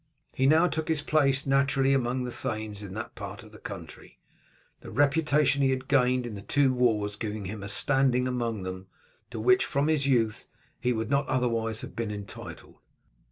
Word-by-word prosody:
He 130 - +2
now 160 +4 +5
took 160 -3 -2
his 160 -3 0
place 140 -3 +2
naturally 135 0 +3
among 125 -1 0
the 125 - -4
thanes 110 -3 -4
in 100 -2 -8
that 110 - -5
part 100 +3 -8
of 110 - -15
the 110 - -14
country, 85 -6 -9 0.6
the - - -11
reputation 145 +1 +2
he 135 - +4
had 130 0 -2
gained 125 -2 +3
in 120 - -5
the 100 - -7
two 135 +4 +2
wars 110 -5 +1
giving 105 -1 -4
him 100 +2 -6
a 100 - -6
standing 130 +2 +2
among 120 -5 -2
them, 95 0 -6 0.4
to - - -6
which, 375 0 +4
from 145 +1 0
his 145 -3 +1
youth, 115 -5 +1 0.3
he 125 - +1
would 110 0 -2
not 140 0 +2
otherwise 115 -3 0
have - - -9
been 115 -2 -2
entitled. 100 -1 -9
125 Hz, 190 wpm, -28 LUFS, 110-140 Hz, 0.6 s, now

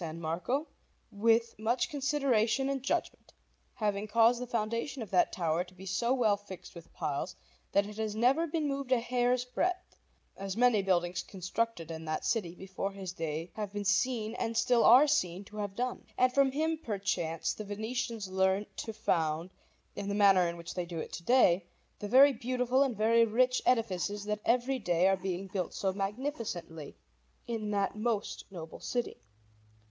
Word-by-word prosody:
Marco 170 - -2 0.5
with 230 +2 +2
much 230 +4 +1
consideration 270 -3 +1
and 275 -1 -1
judgment, 270 - -2 0.4
having 210 -3 -1
caused 230 +3 +4
the 250 - -4
foundation 230 +3 -2
of 210 - -11
that 180 - +3
tower 170 -1 0
to 185 0 -18
be 190 +1 -11
so 235 +6 0
well 235 -6 +3
fixed 200 -2 -11
with 170 -2 -12
piles 145 +5 -3 0.4
that 200 - +3
it 210 +1 -9
has 215 -1 -2
never 265 +9 +3
moved 280 -4 -2
a 255 - +5
hair's 245 +1 +1
breadth, 360 +8 -2 0.4
as 195 +1 -5
many 245 -4 +4
buildings 175 -2 +1
constructed 185 -2 -3
in 160 0 -6
that 155 0 -3
city 180 -7 -1
before 190 +1 -4
his 190 -2 -6
day 165 0 -4
have 210 -2 -4
been 205 0 -4
seen 220 +2 +1
and 230 0 -2
still 240 0 +3
are 255 +6 +8
seen 190 - 0
to 210 - -12
have 205 -2 -4
done. 250 +2 -3
And 255 0 +3
from 275 0 +4
him, 315 +3 0
perchance, 195 - -2
the 215 - -7
Venetians 220 +1 -3
learnt 190 +2 0
to 225 - -4
found, 165 -5 0 0.4
in 200 0 -4
the 200 - -1
manner 195 -3 +5
in 170 0 -4
which 170 0 -7
they 180 -1 -3
do 170 -1 -6
it 160 - -5
to 170 - -6
day, 195 -6 +4 0.3
the 205 - -4
very 270 +5 +7
beautiful 250 +2 0
and 265 -6 +1
very 230 +2 +4
rich 250 +3 +2
edifices 205 -4 +1
that 210 0 -2
every 250 +3 +2
day 175 -3 +2
are 195 - +4
being 185 0 -4
built 190 -2 -4
so 190 -1 0
magnificently 200 - -4 0.5
in 225 -3 -3
that 200 -1 0
most 215 -1 -2
noble 165 -4 -9
city. 245 - -3
215 Hz, 175 wpm, -31 LUFS, 185-245 Hz, 0.5 s, are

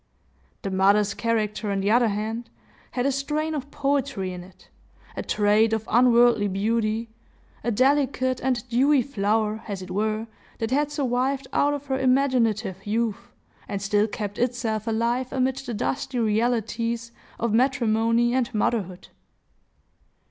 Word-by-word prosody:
The 195 - -3
mother's 200 +2 +3
character, 215 -2 -1
on 200 -1 0
the 200 +2 +1
other 240 +1 +4
hand, 220 +3 -3 0.4
had 250 0 -1
a 275 - +3
strain 300 +4 -2
of 285 -2 -4
poetry 275 -9 -1
in 180 -1 -7
it, 185 0 -18 0.5
a - - -3
trait 215 +2 +2
of 220 -1 -2
unworldly 240 -2 +5
beauty,—a 220 +4 -3
delicate 260 +1 +2
and 255 -2 -1
dewy 260 +3 +3
flower, 215 -2 0
as 195 -3 -5
it 185 - -9
were, 215 +3 -1 0.3
that 225 +1 -3
had 295 +2 +1
survived 270 -1 -1
out 290 0 +2
of 285 0 -7
her 265 -1 -1
imaginative 235 -7 +1
youth, 235 +2 -2 0.4
and 200 -2 -3
still 205 +2 +1
kept 205 -2 -5
itself 235 -3 -1
alive 235 +3 0
amid 260 0 0
the 245 -3 -5
dusty 260 +4 -2
realities 230 +1 0 0.3
of 230 -2 -1
matrimony 235 -1 +2
and 255 -1 0
motherhood. 200 -4 -1
230 Hz, 140 wpm, -25 LUFS, 210-255 Hz, 0.5 s, unworldly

